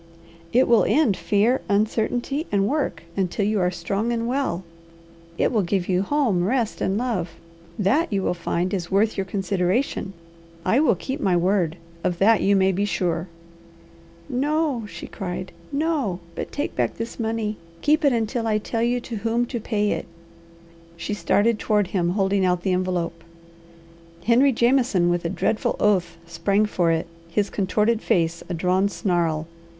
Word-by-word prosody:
"It 255 +3 +4
will 235 -2 +5
end 275 -10 +3
fear, 220 +7 +2
uncertainty, 235 +8 0
and 200 -1 +2
work, 265 - -1
until 195 +1 0
you 210 0 +1
are 180 -1 +2
strong 195 +6 -2
and 230 -1 -1
well. 250 -9 -1 0.7
It - - +2
will 220 - +2
give 185 0 -1
you 185 -1 +2
home, 225 -6 +1
rest, 230 +2 0
and 190 +1 +1
love, 205 -9 -2 0.4
that 230 - +2
you 195 -2 0
will - - +1
find 175 +1 -2
is 175 -3 -2
worth 210 +3 +2
your 195 - -1
consideration. 195 +3 -1 0.5
I 225 +8 +3
will 285 -8 +4
keep 265 - -5
my 185 -10 +2
word; 175 -2 +1 0.3
of 175 - 0
that 215 +3 +4
you 200 +1 +3
may 190 0 +4
be 195 +2 -1
sure." 175 -4 -1 1.0
"No," 285 -3 0
she - - -8
cried. 185 -2 -5 0.2
"No! 280 - 0
But - - -5
take 290 - -3
back 120 -2 0
this 230 +2 -5
money! 220 -2 -2 0.3
Keep 310 +2 +3
it 285 - +5
until 230 0 -1
I 215 -1 +2
tell 225 +2 -3
you 240 +1 +1
to 235 -2 -6
whom 230 +3 0
to 240 0 -4
pay 210 -2 0
it." - - -3 0.9
She 170 +5 -3
started 210 +2 +2
toward 210 -2 +2
him 175 -3 0
holding 195 +1 +1
out 180 -1 +1
the 190 - +1
envelope. 175 -2 -2 1.0
Henry 250 +4 +5
Jameson, 235 -7 +3
with 175 0 -1
a - - +1
dreadful 215 +4 0
oath, 180 -5 +2
sprang 185 +5 +1
for 175 -5 +1
it, 165 +1 0 0.2
his 200 +4 0
contorted 210 +3 +1
face 170 -1 +1
a 175 - -2
drawn 185 +4 +2
snarl. 170 -6 0
205 Hz, 165 wpm, -23 LUFS, 180-235 Hz, 1.0 s, will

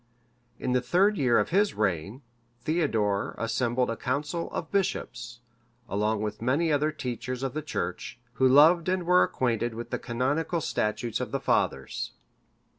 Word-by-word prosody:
In 125 - -2
the 125 0 +2
third 185 +11 +3
year 125 -4 +4
of 105 - +1
his 200 +3 +2
reign, 100 - -1 0.4
Theodore 115 -12 0
assembled 120 +2 0
a - - -2
council 145 +7 -2
of 160 - -5
bishops, 120 -11 -2 0.5
along 105 +1 0
with 105 0 -4
many 145 +7 +1
other 150 +1 +2
teachers 125 -2 -5
of 135 -2 -2
the 155 - -2
church, 90 - -4 0.2
who 130 +2 +3
loved 160 +6 +6
and 185 -1 0
were 180 +1 +5
acquainted 120 -2 0
with 120 +1 -7
the - - -1
canonical 140 +8 -1
statutes 115 -4 -1
of 125 - -3
the 140 - -2
fathers. - - -1
125 Hz, 155 wpm, -27 LUFS, 115-155 Hz, 0.5 s, loved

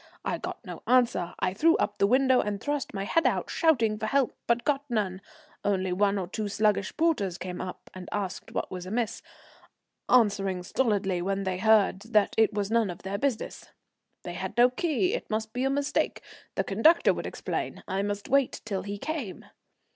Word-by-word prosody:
I - - -1
got - - -7
no - - -8
answer; 235 -9 +2
I 185 - 0
threw 325 - +4
up 205 - -1
the 200 - +4
window 260 +2 +4
and 205 -1 -3
thrust 290 +2 -2
my 195 -2 -3
head 330 +10 +2
out, - - -1
shouting 230 -10 +2
for 220 - -2
help, 275 +1 +2
but 235 0 +2
got 285 -1 +1
none, 200 -5 -1 0.4
only 190 -2 0
one 200 +2 +2
or 185 -3 -3
two 210 +3 -3
sluggish 205 -1 0
porters 250 - +1
came 180 -2 -5
up 185 - -7
and 185 -1 -9
asked 200 -3 -4
what - - -3
was 180 -1 -6
amiss, 225 +2 -2 0.9
answering 195 -6 +3
stolidly, 195 -4 0
when 195 +2 -1
they 185 -1 -2
heard, 215 -2 +4
that 215 -2 +2
it 220 -1 +4
was 205 0 -2
none 230 -3 +2
of 175 - -8
their 195 +1 -3
business. 270 -4 -2 0.5
"They 175 - -6
had 190 +4 -5
no 245 +1 +6
key, 345 - 0
it - - -4
must 220 0 -2
be 250 +2 -1
a - - +2
mistake. 280 +1 0 0.3
The 195 - +1
conductor 225 - +4
would - - -4
explain, - - -4
I 190 +1 -1
must 205 0 -3
wait 275 -1 +2
till 200 -4 -2
he 205 0 -5
came." 270 - -5
210 Hz, 190 wpm, -28 LUFS, 195-250 Hz, 0.9 s, no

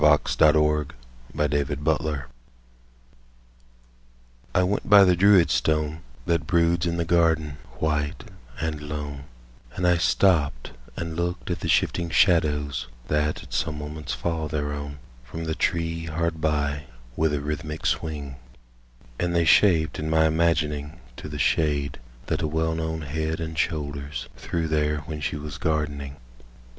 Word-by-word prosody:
THE - - +6 0.2
SHADOW 75 0 +4
ON 75 - -4 0.5
THE 75 -1 0
STONE 75 -1 0 2.3
I 90 - +4
WENT 100 +3 -1
by 100 -1 +9
the 90 -2 +5
Druid 95 -1 +5
stone 80 0 0 0.2
That 85 -3 0
broods 85 0 +2
in 85 0 -1
the 85 - 0
garden 80 -3 +2 0.2
white 75 -2 -1 0.4
and 80 -1 -2
lone, 75 -2 -5 0.5
And 90 - -1
I 90 -1 +4
stopped 80 -8 +2 0.3
and 80 -1 -4
looked 85 +1 -2
at - - -2
the - - -4
shifting 85 -1 +2
shadows 75 -6 +2 0.2
That 75 0 0
at - - -12
some 75 -3 -1
moments 75 0 -5
fall 80 -2 -2
thereon 75 -2 -3 0.3
From 80 +6 -7
the 80 -1 -2
tree 80 0 -1
hard 80 0 -2
by 75 -1 0 0.3
with 80 -1 +2
a 75 - 0
rhythmic 75 +2 -4
swing, 70 -4 -2 0.8
And 85 0 0
they 85 -1 +3
shaped 80 -3 +4
in 75 +1 -3
my 80 0 +4
imagining 80 -1 0 0.2
To - - -7
the 75 - -5
shade 70 0 +1 0.3
that - - -1
a - - 0
well 80 +1 0
known 80 0 -3
head 80 +2 -2
and 80 -1 -4
shoulders 75 -4 -3
Threw 85 -1 -3
there 75 -1 0
when 75 -1 -6
she 70 - -2
was 75 -1 -6
gardening. 75 -3 -2
80 Hz, 145 wpm, -25 LUFS, 75-85 Hz, 2.3 s, by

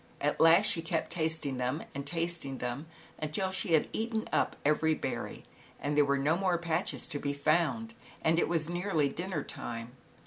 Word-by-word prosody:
At 145 +1 0
last 165 +5 +7
she 175 -5 +2
kept 165 0 -2
tasting 160 -5 -1
them 125 +5 -1
and 140 0 -5
tasting 165 -4 -2
them, 125 +6 -4 0.3
until 155 +5 0
she 190 -2 -1
had 155 - +4
eaten 225 0 -1
up - - +2
every 155 +1 +3
berry - - -4 0.3
and 145 +1 -1
there 150 - +6
were 140 0 +2
no 145 +4 +2
more 185 -1 +1
patches 170 +1 0
to 145 - -3
be 140 0 -1
found, 170 +10 +1 0.3
and 165 +1 +4
it - - +2
was 165 -3 +2
nearly 175 -4 +1
dinner 175 0 -3
time. 115 0 -5
160 Hz, 180 wpm, -31 LUFS, 145-175 Hz, 0.3 s, last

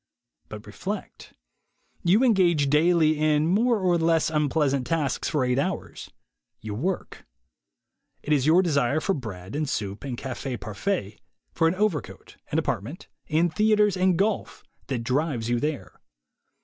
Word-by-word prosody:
But - - -9
reflect. - - -7 0.7
You 195 +8 +4
engage 175 - +3
daily 155 0 +3
in 155 0 +2
more 225 +7 +2
or 180 -2 +2
less 165 -1 +2
unpleasant 145 -3 +1
tasks 155 -2 -1
for 150 -5 0
eight 125 +1 +1
hours; 185 +5 -4 0.5
you 110 -1 -6
work. 170 - -4 1.0
It 150 - 0
is 140 -1 +2
your 175 +4 +5
desire 145 -4 +1
for 195 - 0
bread 105 - -7
and 150 -1 -1
soup 100 -1 -4
and 130 -4 -5
cafe 130 0 -5
parfait, 105 - -3 0.3
for 165 - +2
an 165 - +1
overcoat, 185 - -3
an - - 0
apartment, - - -3 0.2
and 160 +1 +2
theatres 210 +1 +3
and 185 -1 +2
golf, 205 +2 -1 0.2
that 125 -4 -3
drives 130 -2 -1
you 120 - +1
there. 150 -1 -4
155 Hz, 145 wpm, -25 LUFS, 130-180 Hz, 1.0 s, your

